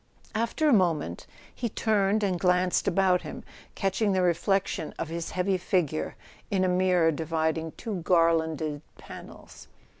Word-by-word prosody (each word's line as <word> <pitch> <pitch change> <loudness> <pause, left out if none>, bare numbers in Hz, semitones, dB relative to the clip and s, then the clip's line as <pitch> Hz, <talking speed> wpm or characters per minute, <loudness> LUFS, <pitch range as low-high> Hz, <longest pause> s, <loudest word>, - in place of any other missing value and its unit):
After 230 +8 0
a 290 - +5
moment 165 - +1 0.3
he 235 - -3
turned 210 -1 +1
and 185 -3 0
glanced 180 0 +2
about 185 -1 +3
him, - - -8 0.3
catching 195 +1 0
the 185 -1 +2
reflection 175 -1 0
of 160 - -4
his 165 0 -4
heavy 185 +1 0
figure 160 - -1 0.3
in 190 -2 +1
a - - +2
mirror 180 -2 +3
dividing 160 0 -2
two 220 -5 -5
garlanded 160 -3 +1 0.2
panels. - - -12
180 Hz, 140 wpm, -27 LUFS, 165-195 Hz, 0.3 s, a